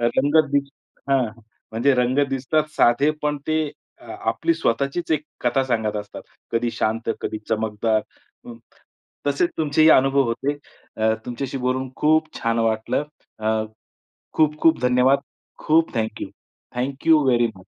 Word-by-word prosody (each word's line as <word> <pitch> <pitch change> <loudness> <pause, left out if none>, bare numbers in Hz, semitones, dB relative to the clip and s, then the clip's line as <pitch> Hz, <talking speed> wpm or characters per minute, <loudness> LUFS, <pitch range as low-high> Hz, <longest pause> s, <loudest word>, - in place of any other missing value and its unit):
रंग 135 +6 +3
दिस 140 -1 +1 0.4
हं, 135 -3 +3
हं. 115 +2 -14 0.3
म्हणजे 130 +4 +2
रंग 125 +2 +1
दिसतात 135 +3 0
साधे 130 +6 +4
पण 150 0 0
ते 155 0 +1 0.5
आपली 335 - -1
स्वतःचीच 140 - -1
एक 150 -1 +1 0.2
कथा 125 +2 +1
सांगत 110 -4 -1
असतात. 105 0 -7 0.3
कधी 115 +1 0
शांत, 115 +1 -1
कधी 110 - -3
चमकदार, 110 0 0 0.5
अ, 120 - -8 0.7
तसेच 145 +5 +1
तुमचेही 155 0 +4
अनुभव 135 0 +5
होते. 140 +5 -1 0.4
अ, 110 0 +2
तुमच्याशी 130 +2 -4
बोलून 130 +1 -1
खूप 155 +1 +3
छान 115 0 0
वाटलं. 115 +5 0 0.3
अ, 110 0 0 0.7
खूप, 155 -1 +2
खूप 160 -6 +4
धन्यवाद. 125 +2 +4 0.5
खूप 160 +1 +3
थँक्यू. 110 -1 -3 0.5
Thank you 140 +5 +2
very 120 -2 +3
much. 95 - -15
130 Hz, 135 wpm, -22 LUFS, 115-145 Hz, 0.7 s, अनुभव